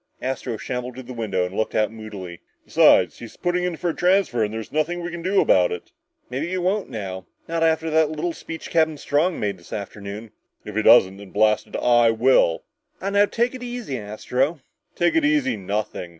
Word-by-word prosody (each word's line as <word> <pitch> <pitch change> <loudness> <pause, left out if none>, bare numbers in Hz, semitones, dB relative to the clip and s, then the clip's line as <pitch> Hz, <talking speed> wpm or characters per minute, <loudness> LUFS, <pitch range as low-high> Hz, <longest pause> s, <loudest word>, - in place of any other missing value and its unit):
Astro 130 -3 -3
shambled 125 +2 -5
to 130 - -8
the 125 +1 -9
window 100 -6 -1
and 90 +2 -7
looked 110 - -1
out 110 0 +2
moodily. 105 -6 -8 0.3
"Besides, - - +4
he's 115 - -10
putting 180 0 0
in 180 -2 -2
for 175 +1 -1
a - - -10
transfer 180 - +2
and 105 - -1
there's 110 0 -6
nothing 155 +3 0
we 175 - -4
can 170 0 -6
do 190 +3 +2
about 90 -1 +4
it!" 90 - -6 0.4
"Maybe 135 +6 -3
he 185 - -2
won't 190 +3 0
now 95 -4 -6 0.2
not 165 0 -2
after 160 0 +2
that 160 -1 +3
little 155 +2 -3
speech 165 0 -8
Captain 160 -2 +2
Strong 155 +6 0
made 100 -3 -2
this 85 - -17
afternoon." 105 +1 -7 0.3
"If 105 - -8
he 110 - +2
doesn't, 95 -4 +6
then, 100 -1 -11
blast 105 +2 +2
it, - - -10
I 120 -1 +4
will!" 115 -7 +3 0.4
"Aw, 195 - -3
now 205 0 +5
take 235 +4 0
it 255 - -8
easy, 240 - -5
Astro!" 125 +8 -2 0.3
"Take 175 -1 +2
it 160 - +3
easy, 145 -4 +2
nothing!" 100 -2 -4
125 Hz, 205 wpm, -23 LUFS, 105-170 Hz, 0.4 s, doesn't